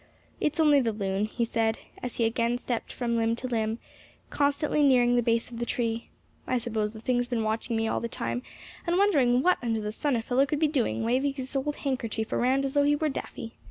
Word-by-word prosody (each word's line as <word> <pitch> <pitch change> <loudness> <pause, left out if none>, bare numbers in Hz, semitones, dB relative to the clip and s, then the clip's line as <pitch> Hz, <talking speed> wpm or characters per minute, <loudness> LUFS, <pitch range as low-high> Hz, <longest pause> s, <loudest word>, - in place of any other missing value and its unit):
"It's 305 +2 -1
only 300 -3 +6
the 230 -3 0
loon," 195 -1 -1
he 235 +2 -1
said, 225 -1 0 0.2
as 250 - -5
he 230 - +1
again 235 +1 +1
slipped 245 -1 -4
from 235 -2 -1
limb 230 0 +1
to 250 - -6
limb, 225 -2 -1 0.5
constantly 290 +1 +1
nearing 250 -3 +5
the 240 - +4
base 230 0 0
of 235 - -7
the - - -1
tree. 230 -1 -2 0.4
"I 255 - +1
suppose 220 -3 -2
the 220 - -9
thing's 245 +1 0
been 240 -2 -1
watching 225 +2 -1
me 225 0 0
all - - 0
the 235 - -3
time, 245 +1 -3 0.5
and 345 +1 +2
wondering 275 -11 +4
what 365 - +3
under 230 -2 0
the 210 0 -3
sun 280 +5 0
a 225 - -1
fellow 260 +4 +2
could 300 - -1
be 310 - +4
doing, 265 -6 0
waving 260 +5 +1
his 265 0 -6
old 290 +2 -1
handkerchief 230 -5 -3
around 265 +3 +2
as 270 - -2
though 290 - +4
he 290 +1 +3
were 310 +1 0
daffy. 230 -4 -7
245 Hz, 230 wpm, -27 LUFS, 225-275 Hz, 0.5 s, only